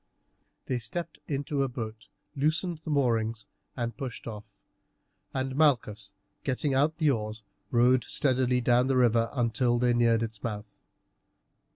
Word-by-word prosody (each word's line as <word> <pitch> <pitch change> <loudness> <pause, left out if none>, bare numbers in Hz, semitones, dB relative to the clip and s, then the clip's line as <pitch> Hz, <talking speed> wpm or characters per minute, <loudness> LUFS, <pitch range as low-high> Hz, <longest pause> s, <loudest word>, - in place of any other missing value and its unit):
They 125 - -1
stepped 165 +9 -4
into 140 0 -1
a 135 - +2
boat, 110 -3 -6 0.3
loosened 155 +4 0
the 160 - -8
moorings, 115 -6 +1 0.3
and 120 -2 -2
pushed 130 -1 -6
off, 105 -2 -9 0.7
and 130 0 -2
Malchus, 115 -9 +2 0.3
getting 135 +1 0
out 150 +4 +2
the 155 -3 +3
oars, 110 -2 -3 0.3
rowed 125 +1 +4
steadily 130 -2 +1
down 125 +1 +3
the 135 -1 +2
river 115 -2 +3
until 120 -1 +1
they 120 0 +3
neared 115 -1 +3
its 110 -2 -5
mouth. 105 -2 -5
125 Hz, 140 wpm, -28 LUFS, 115-135 Hz, 0.7 s, rowed